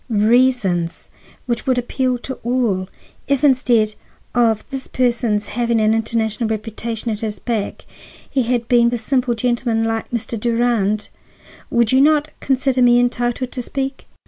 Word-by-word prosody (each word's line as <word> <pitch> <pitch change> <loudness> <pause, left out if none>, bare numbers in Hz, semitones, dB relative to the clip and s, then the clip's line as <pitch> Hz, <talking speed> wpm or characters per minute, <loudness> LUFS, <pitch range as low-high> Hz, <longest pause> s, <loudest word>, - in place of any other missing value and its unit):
"—reasons 215 -6 +1 0.3
which 240 0 -3
would 255 -1 +2
appeal 250 +1 0
to 265 +2 -6
all; 225 -6 0 0.4
if 280 -1 +1
instead 245 -6 +3 0.4
of 225 -3 +2
this 270 -1 -5
person's 235 -4 0
having 235 -1 +1
an 215 0 +3
international 225 0 -1
reputation 225 +1 -3
at 210 - -3
his 215 -2 -4
back 220 -1 -3 0.4
he 270 - 0
had 240 -1 -1
been 240 -1 +4
a 240 - 0
simple 245 +1 0
gentleman 235 -1 0
like 225 0 -2
Mr. 230 -1 -3
Durand,—would 230 0 -1
you 260 +1 +5
not 300 +1 +3
consider 265 -1 +1
me 245 0 +6
entitled 245 +1 -1
to 250 - -4
speak?" 270 +2 -4
235 Hz, 145 wpm, -19 LUFS, 220-250 Hz, 0.4 s, me